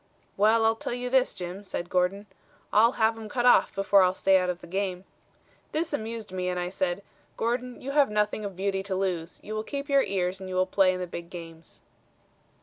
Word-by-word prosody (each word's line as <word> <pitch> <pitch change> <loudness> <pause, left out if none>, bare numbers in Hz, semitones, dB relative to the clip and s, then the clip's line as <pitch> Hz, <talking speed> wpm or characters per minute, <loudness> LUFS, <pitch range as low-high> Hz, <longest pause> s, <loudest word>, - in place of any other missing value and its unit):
'Well, 220 +2 +4
I'll 225 0 +4
tell 230 - -4
you 250 0 -4
this, 260 -1 +3
Jim,' 180 +2 -7
said 175 -3 -5
Gordon, 185 +3 +1 0.5
'I'll 230 +4 +5
have 220 0 +2
'em 215 -1 -8
cut 245 +2 -1
off 250 - +5
before 195 0 +4
I'll 185 0 +3
stay 190 0 +4
out 180 0 -1
of 180 -1 -2
the - - -10
game.' 185 0 -3 0.7
This 315 0 -1
amused 225 -4 -4
me, 185 -1 -2
and 180 0 -2
I 175 0 -2
said, 185 +1 -2 0.3
'Gordon, 245 +2 -2
you 275 - -4
have 285 -3 +4
nothing 210 0 0
of 200 -2 -5
beauty 195 +1 -1
to 195 -1 -3
lose. 180 -3 -2
You 215 - -6
will 215 - -1
keep 280 +5 -5
your 275 -1 +5
ears 185 -3 -1
and 190 -1 -7
you 185 - -4
will 185 0 +3
play 185 0 +3
in - - -5
the 180 - -2
big 170 -1 -8
games.' 165 -2 -11
195 Hz, 225 wpm, -27 LUFS, 180-225 Hz, 0.7 s, I'll